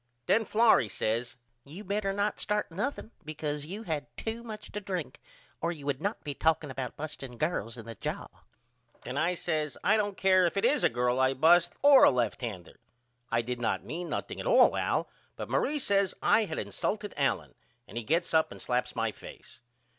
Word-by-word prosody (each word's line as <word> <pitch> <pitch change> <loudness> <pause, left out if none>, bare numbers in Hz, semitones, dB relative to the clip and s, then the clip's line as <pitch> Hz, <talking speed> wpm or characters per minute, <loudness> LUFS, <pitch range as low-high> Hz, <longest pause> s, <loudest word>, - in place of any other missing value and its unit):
Then 225 - +3
Florrie 220 - +4
says 115 +6 -2 0.3
You 165 - -10
better 200 0 -1
not 205 +1 -1
start 210 -3 -1
nothing 215 +5 -3
because 150 -1 -4
you 200 +6 -6
had 155 -7 -3
to 225 +1 -4
much 215 -2 -9
to 210 - -4
drink 180 -8 -4 0.4
or 170 - 0
you 150 -5 -8
would 140 -2 -1
not 205 +3 -2
be 145 - -4
talking 155 -1 +1
about 130 -2 -5
busting 135 -5 -7
girls 125 - -2
in 115 - -9
the 115 - -7
jaw. - - -4 0.8
Then 125 - -5
I 165 +5 +1
says 155 -4 -2
I 215 +2 +4
don't 205 -2 -1
care 185 -2 +4
if 170 - -4
it 195 - +2
is 295 - +3
a - - +5
girl 125 +1 0
I 130 0 +3
bust 170 +5 +5
or 285 -2 +8
a - - +9
lefthander. 115 -6 -3 0.5
I 115 0 +1
did 125 +1 -4
not 115 - 0
mean 175 +2 -5
nothing - - -4
at - - -4
all - - +6
Al - - 0 0.3
but - - -7
Marie 300 - +1
says 200 -7 +1
I 220 - +4
had - - -5
insulted 210 -1 -3
Allen - - 0 0.3
and - - -13
he 120 - -3
gets 165 +9 0
up 160 0 +3
and - - -10
slaps 125 0 -2
my 115 -2 0
face. - - -13
160 Hz, 200 wpm, -29 LUFS, 125-205 Hz, 0.8 s, a